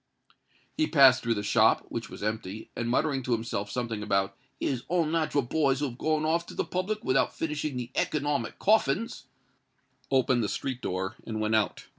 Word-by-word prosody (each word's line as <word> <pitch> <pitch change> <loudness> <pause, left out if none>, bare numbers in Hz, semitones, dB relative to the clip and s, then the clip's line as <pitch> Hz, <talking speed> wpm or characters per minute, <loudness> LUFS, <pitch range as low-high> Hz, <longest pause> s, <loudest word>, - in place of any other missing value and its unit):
He 310 - +1
passed 135 -4 +6
through 115 -1 0
the 105 - -3
shop, - - +3
which - - -5
was - - -9
empty; 105 -1 -4
and, 120 0 -2
muttering 135 +2 +1
to 125 -1 -1
himself 110 -3 -2
something 115 -4 -3
about 100 -2 0 0.2
"his 130 -3 -1
unnat'ral 160 -4 +1
boys 140 -2 +2
who 145 -1 0
had 120 - -12
gone 155 -1 +1
off 170 +2 +1
to - - -9
the - - -1
public 200 +4 -2
without 130 - +1
finishing 150 -3 -2
the 125 0 -5
economic 145 -4 -1
coffins," 210 -5 +1 0.8
opened 130 -3 +3
the 105 - -1
street 130 -2 -3
door 95 +1 -3
and 110 -1 -3
went 110 0 0
out. 110 -3 +1
130 Hz, 180 wpm, -28 LUFS, 110-155 Hz, 0.8 s, passed